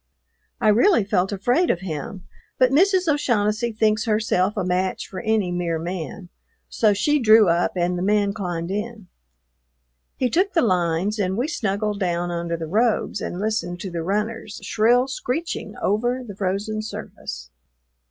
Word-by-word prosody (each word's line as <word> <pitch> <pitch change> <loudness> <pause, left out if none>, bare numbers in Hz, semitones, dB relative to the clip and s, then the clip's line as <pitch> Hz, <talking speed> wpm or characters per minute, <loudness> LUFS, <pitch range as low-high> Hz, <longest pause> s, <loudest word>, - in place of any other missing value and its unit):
I 215 - +3
really 235 - +4
felt 190 -1 0
afraid 245 - +1
of 175 - +1
him, 180 +2 -6 0.3
but 255 0 +4
Mrs. 370 +4 +3
O'Shaughnessy 235 -6 +1
thinks 215 -1 +1
herself 215 -2 +1
a 190 - 0
match 185 +1 -1
for 185 - -7
any 220 -5 0
mere 175 -2 -1
man, 175 +2 -6 0.4
so 215 -2 +2
she 295 +9 +2
drew 220 -4 +6
up 170 +1 +1
and 180 0 0
the - - -3
man 205 +1 +2
climbed 175 -3 -4
in. 210 -1 -5 1.1
He 255 - +1
took 370 - +1
the 330 - +3
lines 185 +1 +1
and 190 -1 0
we 250 +5 0
snuggled 210 - -2
down 175 -2 -1
under 170 0 -2
the 165 - -5
robes 215 +7 0
and 175 - -4
listened 210 -4 -2
to 190 - -5
the 170 -1 -3
runners, 210 +4 -3
shrill 240 +4 +3
screeching 270 +5 -4
over 240 +5 0
the 205 - -8
frozen 200 +3 -2
surface. 65 - -8
205 Hz, 160 wpm, -23 LUFS, 180-230 Hz, 1.1 s, drew